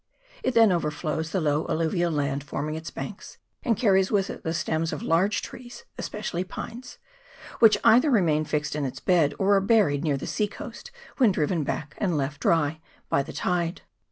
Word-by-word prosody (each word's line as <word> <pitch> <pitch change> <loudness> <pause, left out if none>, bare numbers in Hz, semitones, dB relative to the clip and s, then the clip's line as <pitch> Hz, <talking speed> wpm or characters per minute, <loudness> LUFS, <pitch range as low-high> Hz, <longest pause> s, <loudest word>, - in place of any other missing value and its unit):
It 255 - -1
then 225 -3 +6
overflows 155 -1 -2
the 190 - -1
low 150 -1 0
alluvial 165 +2 0
land 140 -2 -1
forming 145 +1 -4
its 160 +1 -6
banks, - - -8 0.2
and 230 -4 +1
carries 195 -4 +3
with 200 -2 +1
it - - -9
the 160 - -2
stems 160 0 -1
of - - -5
large 185 +6 +1
trees, 240 -1 -10
especially 185 -4 -4
pines, 240 +6 -8 0.6
which 225 -2 +7
either 250 +7 +6
remain 165 - +3
fixed 150 0 -2
in 150 - -2
its 130 - -4
bed, 170 -6 +2
or 200 +1 +3
are 195 - +3
buried 195 -9 +3
near 145 -4 +1
the - - -6
sea 210 - 0
coast 350 - -9 0.3
when 245 -6 +5
driven 160 -1 0
back 145 0 -4
and 180 -7 0
left 140 +1 -3
dry 160 -1 +1 0.3
by - - +2
the - - -7
tide. 175 -1 -2
170 Hz, 185 wpm, -26 LUFS, 150-200 Hz, 0.6 s, which